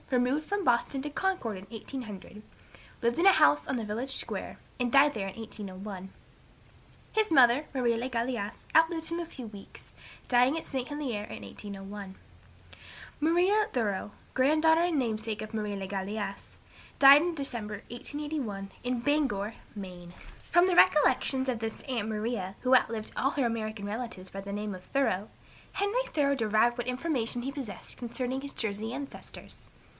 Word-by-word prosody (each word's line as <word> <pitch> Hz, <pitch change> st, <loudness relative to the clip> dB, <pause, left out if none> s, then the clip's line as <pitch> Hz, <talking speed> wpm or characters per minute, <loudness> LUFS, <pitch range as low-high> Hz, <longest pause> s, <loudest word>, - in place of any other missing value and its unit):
removed 255 Hz, +4 st, +2 dB
from 400 Hz, +3 st, -2 dB
Boston 245 Hz, +3 st, +2 dB
to 295 Hz, -, -3 dB
Concord, 345 Hz, -, -1 dB
in 190 Hz, -, -10 dB
1800, 220 Hz, -3 st, -7 dB, 0.6 s
lived 235 Hz, 0 st, +1 dB
in 350 Hz, -, +3 dB
a 390 Hz, -, +10 dB
house 145 Hz, -, +5 dB
on 265 Hz, -, 0 dB
the 225 Hz, -, -3 dB
village 240 Hz, +6 st, -3 dB
square, -, -, -5 dB, 0.2 s
and 245 Hz, -1 st, 0 dB
died 280 Hz, +2 st, +6 dB
there 195 Hz, -3 st, -3 dB
in -, -, -10 dB
1801. 195 Hz, -3 st, -7 dB, 1.0 s
His 435 Hz, -3 st, +2 dB
mother, 260 Hz, 0 st, +6 dB
Marie 245 Hz, -3 st, +2 dB
le 240 Hz, +3 st, -2 dB
Galais, 235 Hz, -4 st, -1 dB, 0.2 s
outlived 325 Hz, 0 st, +4 dB
him 335 Hz, +1 st, -2 dB
a 340 Hz, -, -2 dB
few 265 Hz, -6 st, -8 dB
weeks, 200 Hz, -2 st, -13 dB, 0.3 s
dying 250 Hz, +4 st, +4 dB
at 325 Hz, -, -4 dB
St. 260 Hz, -2 st, -3 dB
Helier, 270 Hz, -8 st, -3 dB
in -, -, -8 dB
1801. 200 Hz, -1 st, -8 dB, 1.1 s
Maria 365 Hz, +7 st, +4 dB
Thoreau, 205 Hz, -4 st, -1 dB, 0.2 s
granddaughter 310 Hz, +5 st, +4 dB
and 345 Hz, -3 st, +1 dB
namesake 220 Hz, -3 st, -2 dB
of 215 Hz, -, -7 dB
Marie 210 Hz, -2 st, -2 dB
le 195 Hz, -1 st, -4 dB
Galais, 200 Hz, +1 st, -4 dB, 0.4 s
died 275 Hz, +1 st, +10 dB
in 345 Hz, 0 st, -1 dB
December, 235 Hz, -7 st, -4 dB
1881, 245 Hz, -6 st, -4 dB
in 250 Hz, 0 st, 0 dB
Bangor, 240 Hz, -7 st, +1 dB, 0.2 s
Maine. 180 Hz, -3 st, -8 dB, 0.4 s
From 350 Hz, +1 st, +5 dB
the 365 Hz, -, +2 dB
recollections 265 Hz, -4 st, +5 dB
of 245 Hz, -3 st, 0 dB
this 225 Hz, -1 st, -4 dB
"aunt 235 Hz, -5 st, -2 dB
Maria," 210 Hz, -3 st, -2 dB
who 255 Hz, 0 st, +5 dB
outlived 225 Hz, -3 st, +1 dB
all 270 Hz, -, +2 dB
her 280 Hz, -4 st, 0 dB
American 215 Hz, -3 st, -2 dB
relatives 210 Hz, -3 st, -5 dB
by 195 Hz, -, -5 dB
the 200 Hz, +1 st, -7 dB
name 205 Hz, -1 st, -3 dB
of 180 Hz, -, -11 dB
Thoreau, 215 Hz, -7 st, 0 dB, 0.4 s
Henry 405 Hz, +6 st, +1 dB
Thoreau 280 Hz, -2 st, +2 dB
derived 225 Hz, 0 st, +2 dB
what 240 Hz, -, -3 dB
information 250 Hz, -3 st, -1 dB
he 270 Hz, -, -2 dB
possessed 260 Hz, -9 st, -6 dB
concerning 250 Hz, +2 st, -3 dB
his 280 Hz, 0 st, -5 dB
Jersey 220 Hz, 0 st, -3 dB
ancestors. 280 Hz, 0 st, -9 dB
240 Hz, 160 wpm, -30 LUFS, 210-280 Hz, 1.1 s, a